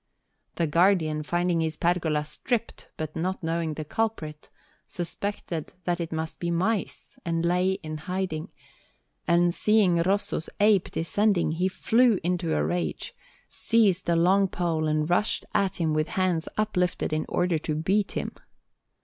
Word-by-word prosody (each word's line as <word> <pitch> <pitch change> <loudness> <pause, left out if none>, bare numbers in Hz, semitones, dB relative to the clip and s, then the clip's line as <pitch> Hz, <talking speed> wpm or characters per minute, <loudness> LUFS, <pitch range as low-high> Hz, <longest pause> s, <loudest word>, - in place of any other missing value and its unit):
The 170 - +1
Guardian, 165 -1 +3
finding 175 +2 0
his 160 -1 -2
pergola 160 -4 +1
stripped, 230 - -3
but 155 -1 -5
not 185 +3 -2
knowing 165 -1 -1
the 155 - -5
culprit, 155 -7 -3 0.4
suspected 175 -2 -4
that 175 0 -1
it 165 - -4
must 160 0 -4
be 170 - -2
mice, 190 +5 -2
and 165 -1 -1
lay 180 +2 +2
in 155 0 -5
hiding; 180 -1 -3 0.8
and 175 0 +4
seeing 195 -5 +3
Rosso's 190 -3 0
ape 205 -2 +4
descending, 190 +1 +1
he 175 +4 0
flew 225 +4 +3
into 175 - 0
a 75 - +1
rage, 80 -1 -2 0.3
seized 200 -6 +2
a 170 - +3
long 190 +4 +4
pole, 165 -4 -1
and 155 0 +1
rushed 175 +5 +1
at 200 -2 +1
him 160 -3 0
with 155 +1 +1
hands 180 -4 0
uplifted 180 -6 0
in 155 - -1
order 175 -2 +1
to 155 0 -3
beat 190 +6 0
him. - - -3
175 Hz, 150 wpm, -26 LUFS, 160-190 Hz, 0.8 s, and